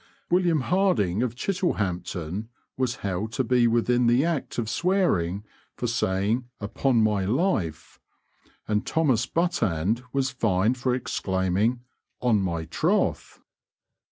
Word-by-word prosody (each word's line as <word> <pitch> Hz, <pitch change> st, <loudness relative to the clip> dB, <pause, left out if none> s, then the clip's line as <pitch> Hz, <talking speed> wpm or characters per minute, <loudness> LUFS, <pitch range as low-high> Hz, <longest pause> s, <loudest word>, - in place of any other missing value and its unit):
William 175 Hz, -4 st, +3 dB
Harding, 130 Hz, -, +1 dB
of 120 Hz, -2 st, -1 dB
Chittlehampton, 100 Hz, -, -2 dB, 0.3 s
was 130 Hz, -2 st, -1 dB
held 100 Hz, +3 st, -2 dB
to 130 Hz, -, 0 dB
be 125 Hz, 0 st, +3 dB
within 120 Hz, +1 st, +2 dB
the 120 Hz, +5 st, +4 dB
act 165 Hz, -5 st, -2 dB
of 115 Hz, -3 st, -1 dB
swearing 110 Hz, -, +1 dB, 0.3 s
for -, -, -4 dB
saying 110 Hz, +1 st, 0 dB
"Upon 115 Hz, +3 st, +1 dB
my 105 Hz, -3 st, +1 dB
life," 100 Hz, -, -1 dB, 0.7 s
and 105 Hz, 0 st, 0 dB
Thomas 135 Hz, -8 st, +1 dB
Buttand 115 Hz, -, 0 dB
was 135 Hz, -1 st, 0 dB
fined 110 Hz, 0 st, +1 dB
for 125 Hz, 0 st, +1 dB
exclaiming 100 Hz, 0 st, 0 dB, 0.4 s
"On 115 Hz, -5 st, +2 dB
my 85 Hz, -3 st, -2 dB
troth!" 80 Hz, -, -1 dB
115 Hz, 120 wpm, -25 LUFS, 95-130 Hz, 0.7 s, the